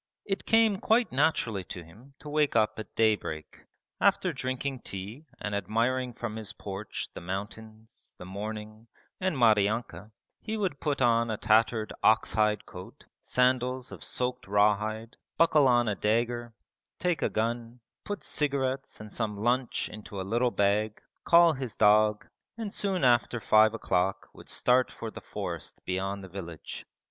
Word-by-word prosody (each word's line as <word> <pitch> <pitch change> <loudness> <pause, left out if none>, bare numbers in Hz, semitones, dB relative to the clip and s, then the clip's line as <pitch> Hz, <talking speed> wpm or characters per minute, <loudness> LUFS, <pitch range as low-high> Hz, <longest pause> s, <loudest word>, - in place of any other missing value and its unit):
It 195 -1 -3
came 225 -3 +4
quite 230 +2 +2
naturally 125 -8 +1
to 90 - -7
him 115 +12 -17
to - - -10
wake 150 -2 +1
up 110 -1 +2
at 110 - -9
daybreak. 95 -9 -1 0.3
After - - +3
drinking 130 +1 -3
tea 105 +10 -7
and 105 - -4
admiring 115 +5 0
from 115 -3 -5
his 105 -3 -5
porch 100 +1 -6
the - - -8
mountains, 110 +4 -7
the - - -9
morning, 105 +3 -7 0.3
and 185 -5 0
Maryanka, 110 -3 +2 0.3
he 220 0 -3
would 185 -9 -2
put 145 -4 0
on 115 -1 +3
a 110 - -1
tattered 110 +1 +2
ox 110 -3 +3
hide 105 0 +1
coat, - - -11
sandals 125 0 +1
of - - -9
soaked 125 -2 -3
raw 105 +1 +4
hide, 110 +2 -6 0.2
buckle 155 -4 +5
on 120 -2 +4
a 105 - +1
dagger, 115 +3 -1 0.4
take 175 -3 0
a - - +1
gun, 115 +2 -2 0.2
put 205 -1 -5
cigarettes 135 -2 -1
and 105 -1 -10
some 105 -3 -2
lunch 120 +4 0
in 105 0 -10
a 95 -1 -3
little 120 +6 +1
bag, 105 0 +1 0.3
call 170 -1 +6
his 130 -5 -5
dog, 105 0 +4 0.3
and 220 -3 -5
soon 195 -3 0
after 120 -1 +3
five 110 0 +5
o'clock 95 -3 -1
would - - -13
start 125 +1 +2
for 115 - -7
the - - -9
forest - - -6
beyond 95 +2 -2
the - - -8
village. 85 -4 -8
115 Hz, 155 wpm, -29 LUFS, 105-130 Hz, 0.4 s, call